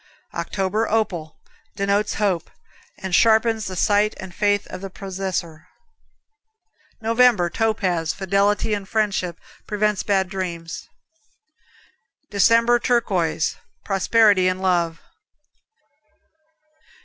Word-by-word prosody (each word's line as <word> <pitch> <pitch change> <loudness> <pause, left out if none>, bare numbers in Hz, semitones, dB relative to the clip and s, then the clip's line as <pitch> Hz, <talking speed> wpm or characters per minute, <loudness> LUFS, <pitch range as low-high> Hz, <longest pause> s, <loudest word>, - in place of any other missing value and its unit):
October, 205 +3 -1
Opal 180 -8 -1 0.4
Denotes 200 +1 0
hope, 190 -6 0 0.5
and 190 -1 -6
sharpens 220 +2 +3
the 185 - -5
sight 205 +3 +2
and 190 -2 -8
faith 205 +1 +1
of - - -7
the 195 - -6
possessor. 185 -4 -5 1.3
November, 225 -6 +3
Topaz 185 -7 0
Fidelity 200 +3 +1
and 200 -2 -4
friendship. 195 -6 -1 0.3
Prevents 210 -1 0
bad 195 -2 +1
dreams. 175 -3 -6 1.4
December, 230 +4 +4
Turquoise 190 -11 0 0.3
Prosperity 200 -1 +3
in 185 0 0
love. 175 -3 0
195 Hz, 90 wpm, -22 LUFS, 185-215 Hz, 1.4 s, December